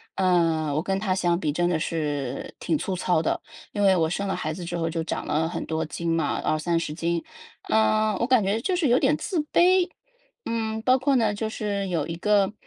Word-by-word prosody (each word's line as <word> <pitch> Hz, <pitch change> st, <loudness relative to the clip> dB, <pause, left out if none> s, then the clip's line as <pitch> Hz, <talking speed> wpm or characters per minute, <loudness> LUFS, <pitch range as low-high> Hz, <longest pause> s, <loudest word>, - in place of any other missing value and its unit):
呃， 165 Hz, -5 st, +2 dB
我 155 Hz, -, +1 dB
跟 190 Hz, +2 st, -1 dB
她 195 Hz, -2 st, 0 dB
相 175 Hz, -2 st, +1 dB
比 155 Hz, -4 st, -1 dB
真 175 Hz, +4 st, +1 dB
的 175 Hz, -, +1 dB
是 145 Hz, -5 st, -3 dB
挺 315 Hz, -, +1 dB
粗 195 Hz, -9 st, -3 dB
糙 175 Hz, -2 st, +1 dB
的。 -, -, -1 dB, 0.3 s
因 205 Hz, -, 0 dB
为 195 Hz, -1 st, +6 dB
我 160 Hz, -2 st, +2 dB
生 200 Hz, +4 st, -2 dB
了 -, -, 0 dB
孩 155 Hz, 0 st, -3 dB
子 180 Hz, +1 st, -7 dB
之 175 Hz, 0 st, -4 dB
后 165 Hz, -1 st, -1 dB
就 165 Hz, 0 st, -2 dB
长 -, -, -4 dB
了 160 Hz, +2 st, 0 dB
很 -, -, -4 dB
多 160 Hz, 0 st, -2 dB
斤 170 Hz, +2 st, -4 dB
嘛， 160 Hz, -3 st, 0 dB
20-30 160 Hz, 0 st, 0 dB
斤。 170 Hz, +1 st, -1 dB, 0.5 s
呃， 215 Hz, -1 st, +3 dB
我 -, -, +3 dB
感 255 Hz, -2 st, +4 dB
觉 200 Hz, +3 st, 0 dB
就 370 Hz, -, -1 dB
是 350 Hz, -4 st, +2 dB
有 245 Hz, 0 st, +4 dB
点 -, -, +2 dB
自 355 Hz, -6 st, -1 dB
卑。 360 Hz, 0 st, +4 dB, 0.6 s
嗯， 220 Hz, -1 st, -2 dB
包 255 Hz, +1 st, +4 dB
括 270 Hz, +2 st, +1 dB
呢， 220 Hz, -3 st, +2 dB
就 220 Hz, +1 st, -3 dB
是 200 Hz, -3 st, -3 dB
有 165 Hz, -5 st, -1 dB
一 165 Hz, -, -4 dB
个 205 Hz, +2 st, +2 dB
180 Hz, 230 characters per minute, -25 LUFS, 165-220 Hz, 0.6 s, 为